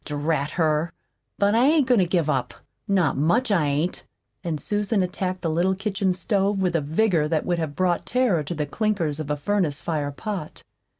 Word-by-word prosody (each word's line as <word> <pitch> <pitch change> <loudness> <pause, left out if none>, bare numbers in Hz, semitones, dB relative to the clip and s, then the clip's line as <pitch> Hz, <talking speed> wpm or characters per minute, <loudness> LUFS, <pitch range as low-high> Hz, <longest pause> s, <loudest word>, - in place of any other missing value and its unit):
Drat 145 0 -1
her! 160 0 +1 0.5
But 200 +1 +2
I 240 +4 +4
ain't 305 -2 +4
goin' 245 -3 +3
to 180 - +3
give 170 -3 +1
up. 130 -5 -1 0.3
Not 185 -8 +2
much 215 - +2
I 170 -7 +2
ain't!" 150 +5 -1 0.4
And 165 -4 -2
Susan 205 - 0
attacked 185 0 -3
the 165 - 0
little 180 +4 +1
kitchen 195 -2 -1
stove 195 +2 0
with 180 -2 0
a 165 - +2
vigor 160 +1 +1
that 155 -1 0
would 175 -1 0
have 155 -3 -3
brought 180 -2 0
terror 245 -10 +2
to 175 - -4
the 150 -1 -1
clinkers 170 -3 -1
of 150 -2 -5
a 150 - 0
furnace 160 -2 0
fire 145 0 -2
pot. 180 +2 -6
175 Hz, 195 wpm, -24 LUFS, 150-200 Hz, 0.5 s, I